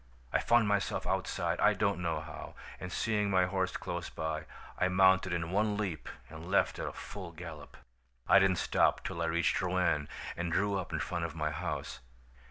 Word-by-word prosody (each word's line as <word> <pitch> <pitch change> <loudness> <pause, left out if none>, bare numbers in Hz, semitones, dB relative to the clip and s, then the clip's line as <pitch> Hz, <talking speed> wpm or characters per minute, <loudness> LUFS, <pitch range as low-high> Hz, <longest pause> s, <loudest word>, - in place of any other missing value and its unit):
I - - +4
found 120 -2 +4
myself 100 -3 0
outside, - - -1
I - - +5
don't 100 -3 +1
know 80 -3 -1
how, 75 - -9 0.2
and - - -6
seeing 105 -2 0
my 95 -2 +4
horse 95 0 -1
close - - -4
by, 80 -1 -3 0.3
I 90 - +4
mounted 95 0 +4
in 85 -1 -2
one 105 +1 +1
leap 95 -7 -3 0.2
and 80 +3 -9
left 100 - +2
at - - -2
a - - -3
full 95 -4 -8
gallop. 80 -3 -9 0.5
"I 100 - +8
didn't 95 -1 +4
stop - - +2
till 85 - -4
I - - +1
reached 85 0 +1
Rouen 90 -5 +1 0.3
and 85 0 -2
drew 100 +3 +1
up 95 -3 -3
in - - -1
front 85 0 -2
of 80 -1 -6
my 75 -2 -1
house. 60 -4 -4
90 Hz, 190 wpm, -32 LUFS, 80-100 Hz, 0.5 s, I